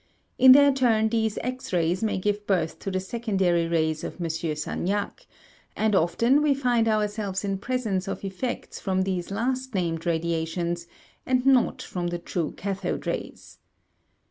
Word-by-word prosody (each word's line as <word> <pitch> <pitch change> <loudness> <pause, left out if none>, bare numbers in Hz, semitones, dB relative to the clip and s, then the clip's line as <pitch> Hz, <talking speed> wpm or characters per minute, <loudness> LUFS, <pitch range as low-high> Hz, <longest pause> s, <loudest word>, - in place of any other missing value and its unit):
In 260 0 +10
their 285 0 +6
turn 225 -4 +2
these 220 -1 0
X 255 +1 -4
rays 175 0 +1
may 215 - 0
give 205 +2 -2
birth 175 -5 0
to - - -4
the 185 -1 -1
secondary 190 -5 0
rays 160 -2 0
of - - -6
M. 170 - -2
Sagnac; 165 +5 -3 0.5
and 220 0 +1
often 230 - +3
we 295 -2 +3
find 245 -4 +1
ourselves 210 -2 -1
in 195 -1 -2
presence 215 -5 -2
of 195 - -4
effects 195 +6 -4
from 190 -1 0
these 185 -2 -2
last 255 +4 -2
named 165 -3 -1
radiations 170 +1 -1 0.4
and 255 0 +1
not 265 -3 +3
from 175 -1 -4
the 175 0 -2
true 170 -1 -3
cathode 195 -1 -3
rays. - - -5
195 Hz, 155 wpm, -26 LUFS, 175-230 Hz, 0.5 s, In